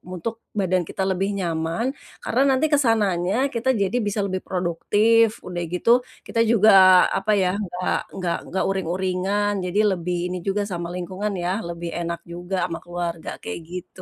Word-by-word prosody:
untuk 220 +6 -4 0.2
badan 185 -1 +2
kita 190 - -2
lebih 190 +2 0
nyaman, 165 +3 -1 0.4
karena - - +1
nanti 265 +3 +3
ke - - +6
sananya 195 -4 +2 0.2
kita 240 +2 -1
jadi 200 +5 +1
bisa 205 +1 -1
lebih 185 -1 -3
produktif, 210 +6 +2
udah 175 -1 -4
gitu 180 - -1 0.4
kita 230 - -2
juga 220 -1 +5 0.5
apa 205 +2 0
ya 185 - +2
enggak 180 -1 -2 0.2
enggak 175 -3 -2
enggak 190 - -1
uring-uringan 190 +2 0
jadi 180 +3 -1
lebih 175 0 -2 0.2
ini - - -2
juga 200 +1 +1
sama 170 -1 -3
lingkungan 190 +4 -3
ya 175 - 0 0.2
lebih 170 0 -5
enak 170 0 -3
juga 175 +2 -5
ama 165 - -4
keluarga 175 -1 -4
kayak 225 -5 -5
gitu. 180 +1 -8
185 Hz, 165 wpm, -23 LUFS, 175-205 Hz, 0.5 s, ke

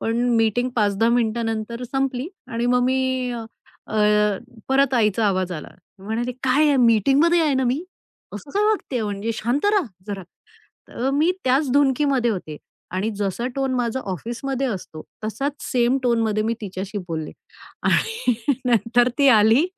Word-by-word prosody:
पण 225 0 -1 0.2
मीटिंग 225 +3 +2
5-10 210 0 +2
मिनिटानंतर 230 0 -1
संपली 270 +2 -2 0.2
आणि 230 +1 -1
मग 250 0 +3
मी 260 -1 0
अ, 235 -1 -5 1.2
परत 270 0 +3
आईचा 215 -2 +2
आवाज 185 -2 0
आला. 155 - -6 0.3
म्हणाले, 225 +5 -3
"काय 265 +4 +3
आहे? 290 -2 +3
मीटिंगमध्ये 275 - +4
आहे 305 -4 +2
ना 260 0 +1
मी. 255 +6 0 0.5
असं 205 +7 -9
काय 410 +5 +1
वागतेय, 395 - 0
म्हणजे 205 +2 -2
शांत 240 - -1
रहा 410 -2 +3 0.2
जरा." 200 -2 -5 0.7
तर 260 +3 -2
मी 310 +5 +3
त्याच 265 +2 +2
धुंदीमध्ये 275 -3 +2
होते 175 -7 -5 0.4
आणि 195 +4 -1
जसा 205 +4 -2
टोन 270 -1 0
माझा 245 +1 -1
ऑफिसमध्ये 240 - -3
असतो, 180 -8 -5 0.2
तसाच 270 +7 -2
सेम 250 +2 +2
टोनमध्ये 225 -3 +1
मी 225 +2 0
तिच्याशी 195 +1 -5
बोलले. 160 -2 -4 0.5
आणि 450 - +1 0.3
नंतर 240 +1 +3
ती 280 -1 +5
आली, 220 +8 +5
240 Hz, 145 wpm, -22 LUFS, 215-270 Hz, 1.2 s, ती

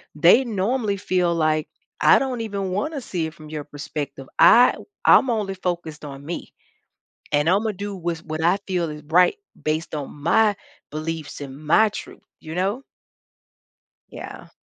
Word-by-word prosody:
they 175 - +6
normally 215 -1 -1
feel, 180 -2 +1
like, 155 -1 +1 0.3
“I - - +7
don't 255 -3 -2
even 200 -4 -3
wanna 285 - -2
see 175 -8 -3
it 160 - -9
from 155 -1 -13
your 155 -1 -5
perspective, 145 -2 -6
I 245 +1 +8
w - - -11 0.2
I'm 265 - +6
only 210 -4 -1
focused 170 -5 -4
on 140 0 -9
me, 170 +3 -6 0.8
and 150 +1 +2
Imma 210 +4 +2
do 200 +1 -5
with 170 -2 -4
what 155 0 -4
I 180 +4 +4
feel 175 -3 -1
is 150 -1 -8
right 180 - +4 0.3
based 155 +1 -2
on 145 -2 -5
my 210 +4 +4 0.4
beliefs 155 0 -5
and 135 -1 -7
my 215 +8 +5
truth,” 210 - -9 0.2
you 160 +1 -8
know? 200 +8 0 1.3
Yeah. - - -9
175 Hz, 160 wpm, -23 LUFS, 155-205 Hz, 1.3 s, I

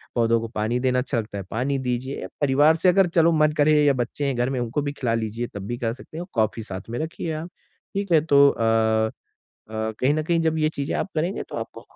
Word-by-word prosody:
पौधों 115 -1 +3
को 115 - -4
पानी 110 +3 0
देना 125 0 +1
अच्छा 125 -1 -1
लगता 105 -2 -6
है, 100 - -4
पानी 130 +5 0
दीजिए। 125 +2 -3
परिवार 145 +3 +4
से 180 - +3
अगर 190 +1 +4
चलो 165 +1 +5
मन 155 - +4
करें 155 +1 +5
या 145 -1 +5
बच्चे 140 +4 -5
हैं 135 -2 0
घर 120 +2 +1
में, 130 - -2
उनको 120 +4 -1
भी 145 0 -2
खेला 125 -5 -1
लीजिए, 115 +1 -2
तब 100 -1 -5
भी 120 - -3
कर 115 -2 -2
सकते 145 +5 -12
हैं - - -3
और 175 - -7
कॉफ़ी 110 +1 -1
साथ 95 -1 -8
में 120 - -3
रखिए 160 +1 -4
आप। 170 - -8 0.5
ठीक 200 -1 -2
है, 160 - +6
तो 140 -2 +5
अ 110 -1 +2 0.6
अ, - - -11 0.3
कहीं 130 +3 +3
न 155 - 0
कहीं 170 +1 +1
जब 160 -1 +1
ये 155 - +3
चीज़ें 140 -2 -4
आप - - -1
करेंगे, 170 +6 -1
तो - - -9
आपको - - -7
130 Hz, 250 wpm, -24 LUFS, 115-155 Hz, 0.6 s, है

